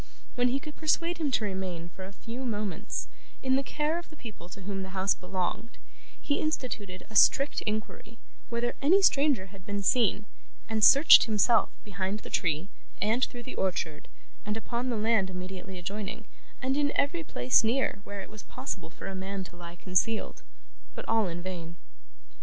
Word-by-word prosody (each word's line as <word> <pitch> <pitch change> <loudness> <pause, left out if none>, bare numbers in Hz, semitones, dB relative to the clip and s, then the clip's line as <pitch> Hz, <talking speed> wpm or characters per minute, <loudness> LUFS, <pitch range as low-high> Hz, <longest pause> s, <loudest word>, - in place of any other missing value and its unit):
When 245 0 +2
he 260 +2 +1
could 300 +2 -9
persuade 335 +2 +1
him 305 -3 +1
to 250 - +1
remain, 185 -4 -4
for 185 +2 -9
a 190 - -9
few 235 +5 -7
moments, 210 -5 -3 0.4
in 260 0 +3
the 270 - +3
care 300 +4 -1
of 345 - -12
the 310 - -13
people 215 - -10
to 195 - -10
whom 195 0 -4
the 190 0 -6
house 190 +1 +3
belonged, 185 +5 -4 0.4
he 285 - 0
instituted 220 -11 -3
a - - -10
strict 275 +5 +5
inquiry 215 +2 -4 0.3
whether 235 +1 -1
any 365 +8 +5
stranger 275 - +3
had 195 -2 -13
been 200 +1 -3
seen, 215 -1 +3 0.4
and 220 -1 0
searched 280 +7 +9
himself 220 +1 +3 0.2
behind 200 +1 -3
the - - -10
tree, 160 +1 0 0.3
and 225 +5 +2
through 240 -1 -9
the 260 - -7
orchard, 175 -5 -2 0.4
and 210 +1 -2
upon 240 +2 -3
the 235 - 0
land 215 -3 +2
immediately 185 +1 -6
adjoining, 195 +3 -5 0.4
and 265 +2 +1
in 290 -1 +2
every 330 +4 +1
place 125 - +3
near, 225 -3 +1
where 200 -1 -6
it - - -9
was 215 -1 -8
possible 200 -10 -6
for - - -11
a 195 - -4
man 190 +1 -4
to 180 - -12
lie 170 0 -9
concealed; 185 +5 0 0.5
but - - -7
all 220 -3 +3
in 175 0 -5
vain. 170 -3 -6
210 Hz, 180 wpm, -29 LUFS, 185-255 Hz, 0.5 s, searched